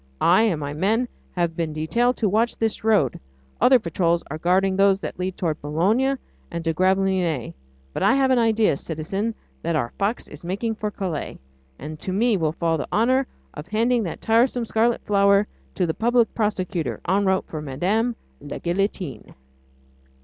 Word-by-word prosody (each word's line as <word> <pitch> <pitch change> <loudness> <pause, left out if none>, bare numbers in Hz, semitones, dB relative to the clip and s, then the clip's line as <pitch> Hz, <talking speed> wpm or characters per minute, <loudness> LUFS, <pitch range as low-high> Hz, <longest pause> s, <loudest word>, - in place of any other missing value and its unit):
I 180 +5 +5
and 180 -9 0
my 145 -1 -4
men 215 +10 +1 0.3
have 170 -2 0
been 160 -2 -2
detailed 235 +11 +1
to 220 - +1
watch 220 +4 +1
this 225 -1 -1
road, 210 - +2 0.4
other 260 0 +7
patrols 170 -4 0
are 155 - -4
guarding 190 +3 +2
those 195 0 +4
that - - -6
lead 185 0 -3
toward 160 -4 -2
Boulogne 210 - +1 0.3
and 170 -1 -5
to 165 - +1
Gravelines; 185 - +1 0.4
but - - -4
I 260 - +4
have 270 -1 +3
an 255 - +4
idea, 220 -8 +3
citizen, 195 +10 -3 0.3
that 170 0 -1
our 120 -6 -1
fox 205 +4 -1
is 150 - -12
making 200 +6 -2
for 215 -1 -3
Calais, 185 -7 -4 0.4
and 155 +3 -8
that - - -26
to 185 - -3
me 225 +3 +3
will 160 -5 0
fall 165 -1 0
the - - -3
honour 255 +4 +2 0.3
of 150 - -8
handing 230 +3 +2
that 180 -6 -5
tiresome 235 +2 +2
scarlet 230 +2 +1
flower 200 0 +4 0.3
to 185 - +1
the 160 - -1
Public 235 +2 +2
Prosecutor 185 - -2
en 195 +3 +2
route 190 0 +1
for 155 - -6
Madame 190 - 0 0.3
la 145 - -6
Guillotine." 180 -3 -3
195 Hz, 180 wpm, -23 LUFS, 165-225 Hz, 0.4 s, other